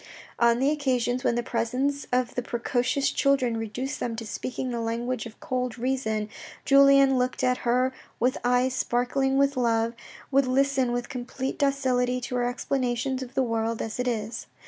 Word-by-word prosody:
On 235 0 +4
the 270 +4 +2
occasions 255 -4 0
when 235 - +2
the 240 - 0
presence 255 +5 -1
of 250 0 +1
the 250 - -1
precocious 245 +4 0
children 270 -4 +2
reduced 235 +6 -4
them 230 -2 -2
to 225 0 -6
speaking 255 +3 -4
the 235 -1 -2
language 230 +1 -2
of 225 - -15
cold 250 -5 -2
reason, 230 -4 -1 0.4
Julien 275 -1 +6
looking 255 +1 0
at 250 0 +1
her 250 +2 +1 0.3
with 250 +2 +1
eyes 250 +1 +2
sparkling 265 +2 0
with 280 0 +3
love, 230 -2 +1 0.4
would 275 -1 +3
listen 265 -1 +2
with 245 0 -2
complete 255 +1 -5
docility 255 -3 +1
to 250 - -4
her 245 - +1
explanations 255 0 -1
of 260 +1 -8
the 265 - +3
world 230 -1 -1
as 225 +2 -4
it 250 - 0
is. 225 -1 -3
250 Hz, 170 wpm, -26 LUFS, 235-265 Hz, 0.4 s, Julien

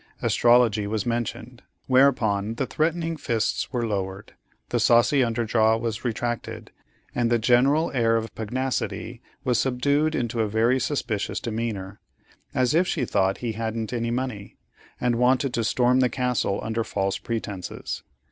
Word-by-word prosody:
Astrology 120 -4 +4
was 105 -1 -2
mentioned, 120 0 -3 0.2
whereupon 115 -6 +3
the 135 - -1
threatening 165 +4 -1
fists 115 -6 -1
were 120 -3 -1
lowered, 100 -2 -4 0.4
the - - 0
saucy 120 +4 +4
under 115 0 -1
jaw 110 0 +3
was 115 -1 -3
retracted, 120 0 -3 0.4
and 120 -1 +1
the 120 - +3
general 130 +7 +3
air 115 -3 +2
of 115 0 -2
pugnacity 130 +4 -3 0.2
was 125 -1 +1
subdued 140 +4 +1
into 120 -1 -1
a 110 - 0
very 115 +5 +2
suspicious 125 -6 -2
demeanor, 110 -4 -4 0.5
as 130 0 +1
if 175 +3 +3
she 135 -7 0
thought 95 -3 +1
he 115 - 0
hadn't 110 +1 -3
any 115 -1 -1
money, 120 -4 -4 0.4
and 120 -1 +1
wanted 125 +1 +2
to 115 - 0
storm 125 +3 +3
the 125 -1 +3
castle 125 -6 0
under 110 +1 -1
false 100 -3 -2
pretences. 105 -5 -5
120 Hz, 145 wpm, -25 LUFS, 110-125 Hz, 0.5 s, Astrology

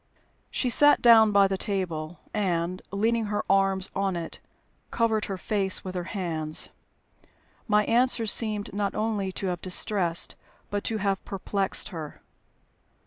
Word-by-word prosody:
She 250 - -1
sat 290 +4 +5
down 225 -2 +6
by 200 -1 +5
the 195 -1 -3
table, 175 -5 -3 0.2
and, 180 -3 -1
leaning 225 +3 0
her 205 0 -2
arms 195 -1 +2
on 195 -1 0
it, 170 -1 -6 0.5
covered 225 -2 0
her 195 - -5
face 195 -1 +1
with 185 - -5
her 180 -1 -4
hands. 165 -6 -1 1.0
My 210 -1 +3
answers 235 -2 +2
seemed 210 -3 0
not 200 -1 -2
only 210 -3 -1
to 195 - -4
have 180 -2 -3
distressed, 180 -2 +2 0.4
but 205 0 -2
to 225 - -1
have 195 -2 -1
perplexed 195 0 -2
her. 160 -6 -8
195 Hz, 140 wpm, -26 LUFS, 185-215 Hz, 1.0 s, down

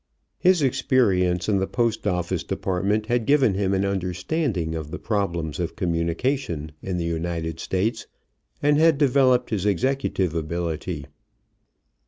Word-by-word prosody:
His 180 -4 +4
experience 100 -10 +2
in 100 -2 +2
the 95 - 0
Post 115 -3 0
office 90 -3 -1
Department 100 +3 -1
had 120 0 0
given 135 -7 +4
him 95 0 0
an 95 0 +1
understanding 95 - -1
of 80 -2 -5
the 90 - -5
problems 85 -8 -2
of 85 - -3
communication 85 - -1
in 95 -2 -3
the 85 - -2
United 80 -1 -3
States, 110 +7 -1 0.6
and 145 +1 +4
had 160 -2 +5
developed 130 -3 +3
his 105 -2 0
executive 105 - 0
ability. 85 0 -3
95 Hz, 135 wpm, -24 LUFS, 85-125 Hz, 0.6 s, had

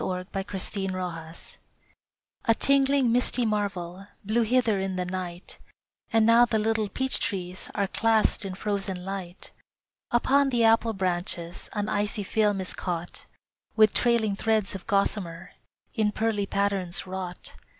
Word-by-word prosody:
NOVEMBER 190 +1 -3
MORNING 165 -3 -5 1.1
A 230 - +4
tingling, 275 -2 +4
misty 245 0 +2
marvel 195 -3 -3 0.2
Blew 220 +4 +2
hither 230 -2 +2
in 190 -1 -2
the 180 0 -2
night, 180 -1 -6 0.5
And 225 -1 +4
now 230 +1 +6
the 230 -2 +2
little 220 -1 0
peach 265 +4 +1
trees 185 -3 -4
Are 200 - +1
clasped 220 +2 +2
in 190 -2 -5
frozen 195 -2 -3
light. 190 -2 -6 0.6
Upon 275 +4 +3
the 240 -3 +1
apple 225 0 +4
branches 175 -2 -2
An 205 -1 -2
icy 205 +1 -1
film 205 0 +1
is 185 - -3
caught, 175 -1 -5 0.5
With 215 -1 +5
trailing 230 -4 +2
threads 215 -1 0
of 195 -2 -8
gossamer 190 -3 -1 0.4
In 215 -3 +1
pearly 210 -2 -1
patterns 195 -3 0
wrought. 185 -1 -6
200 Hz, 135 wpm, -26 LUFS, 185-225 Hz, 1.1 s, now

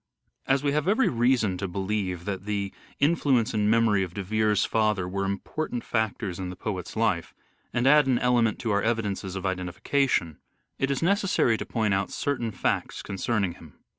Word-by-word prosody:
As 135 +1 +2
we 145 - +2
have 150 +3 0
every 220 +7 +3
reason 115 -6 +2
to 100 - -2
believe 95 -1 -2
that 95 -1 -4
the 100 -2 -2 0.3
influence 140 -6 +2
Father 110 - 0
and 105 - +2
memory 110 -3 +3
of 90 -2 -4
De 100 - -3
Vere's 105 +1 +2
father 105 -5 +1
were 100 +1 -2
important 120 +6 -3
factors 110 -4 -2
worshiP - - -3
in 90 - -4
the 90 - -7
poet's 95 -1 -5
life, 110 -7 0 0.4
and 120 - 0
add 145 +1 +6
an 130 -2 +3
element 120 -3 +2
to 115 - -1
our 100 0 +2
evidences 105 -4 -1
of 95 0 -4
identification, 90 - 0 0.4
it 135 - +1
is 140 +2 -1
necessary 190 - +2
to - - -5
point 110 -4 0
out 95 0 0
certain 135 -5 -2
facts 100 - -2
concerning 100 -1 -1
him. 80 -4 -15
110 Hz, 190 wpm, -26 LUFS, 95-125 Hz, 0.4 s, add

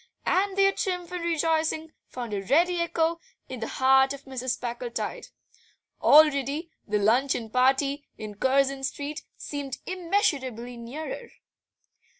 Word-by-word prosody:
And 390 +1 +1
their 390 0 +5
triumph 360 -3 -3
and 360 -1 -4
rejoicing 320 -1 0 0.2
found 240 -4 -6
a 200 - -1
ready 340 - +2
echo 335 0 0 0.3
in 260 -2 -7
the 225 - -3
heart 265 +1 +4
of 280 0 -10
Mrs. 260 -1 -3
Packletide; 240 -1 -4 0.7
already 300 +1 +5 0.2
that 210 0 +1
luncheon 230 +2 +1
party 270 +3 +2
in 215 -1 -7
Curzon 270 +4 +1
Street 290 +3 -4 0.2
seemed 280 -3 -5
immeasurably 290 - -1
nearer. 285 - -7
275 Hz, 125 wpm, -27 LUFS, 250-330 Hz, 0.7 s, their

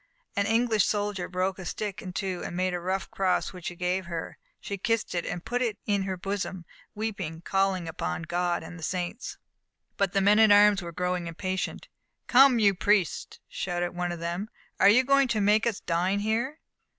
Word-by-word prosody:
An 200 -1 +1
English 225 -2 +3
soldier 205 -3 -1
broke 185 +1 -1
a - - -6
stick 205 +4 -4
in 185 -4 -6
two 190 -1 -3
and - - -5
made 185 0 0
a 175 - -1
rough 190 +2 -3
cross, 190 0 0
which 180 -2 -7
he 175 - -5
gave 180 +1 -1
her. 165 -2 -5 0.2
She 200 -1 -5
kissed 230 +3 0
it 175 - -2
and 175 -1 -5
put 245 +2 -1
it 225 -4 0
in 200 -2 +1
her 190 -1 -3
bosom, 190 -1 -4 0.3
weeping, 200 -7 -4
calling 195 -1 0
upon 120 - -3
God 175 +1 -1
and 175 +1 -9
the - - -10
saints. 180 +7 -3 0.6
But 195 -2 +1
the 195 - +3
men 205 +2 +5
at 220 -1 +7
arms 205 -1 +6
were 170 -1 -6
growing 180 0 -2
impatient. 185 +2 -3 0.4
"Come, 265 0 +6
you 205 -3 +4
priests!" 195 -1 +1
shouted 175 -1 -2
one 175 0 -2
of 175 - -5
them, 175 +5 -3 0.3
"are 200 - +7
you 245 +5 +6
going 275 0 +4
to 235 -3 0
make 210 +3 +3
us 225 -4 -2
dine 180 +4 0
here?" 235 +8 -1
190 Hz, 200 wpm, -27 LUFS, 175-210 Hz, 0.6 s, at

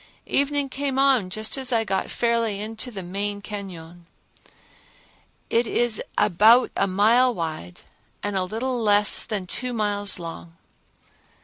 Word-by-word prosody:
Evening 285 0 0
came 270 0 -4
on 265 -8 +3
just 215 +7 -1
as 260 -1 0
I 230 -2 +2
got 195 -3 -2
fairly 230 -3 -1
into 220 +3 -5
the 200 -6 -7
main 200 +3 -3
cañon. 175 -5 -9 1.5
It 235 +1 +2
is 240 -1 +1 0.2
about 215 +5 +4
a 195 - +1
mile 225 +6 +3
wide 155 - -6 0.4
and 205 -1 -3
a 190 - 0
little 235 +6 -3
less 205 -1 +5
than 205 -4 -4
two 250 +7 -1
miles 205 -2 +1
long. 165 -1 -9
210 Hz, 135 wpm, -23 LUFS, 190-240 Hz, 1.5 s, less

